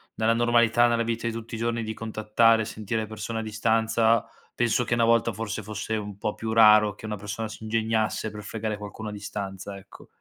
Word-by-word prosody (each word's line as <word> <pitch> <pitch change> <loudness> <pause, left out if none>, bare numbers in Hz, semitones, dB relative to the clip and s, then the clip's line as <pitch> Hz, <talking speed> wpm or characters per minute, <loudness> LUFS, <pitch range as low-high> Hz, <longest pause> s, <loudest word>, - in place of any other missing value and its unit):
nella 110 +1 +2
normalità, 120 0 +4
nella 115 0 +1
vita 115 0 -2
di 115 - -2
tutti 115 0 -6
i - - -4
giorni 115 0 -1
di 110 0 -4
contattare 110 +1 +2
e - - -2
sentire 110 +1 -3
le 110 - -5
persone 110 +1 -5
a - - -2
distanza, 110 +1 +2 0.3
penso 120 0 +1
che 120 - -1
una 120 - +2
volta, 115 0 +3
forse, 110 0 -4
fosse 105 +1 -4
un 105 -2 -6
po' 105 0 -2
più 110 0 -4
raro 105 -2 +6
che 110 - -11
una 105 -1 -4
persona 105 +2 -5
si 110 - -10
ingegnasse 110 -1 0
per 105 -1 -8
fregare 110 0 -4
qualcuno 105 +1 -7
a - - -6
distanza, 100 -1 -6
ecco. 95 - -15
110 Hz, 215 wpm, -26 LUFS, 105-115 Hz, 0.3 s, raro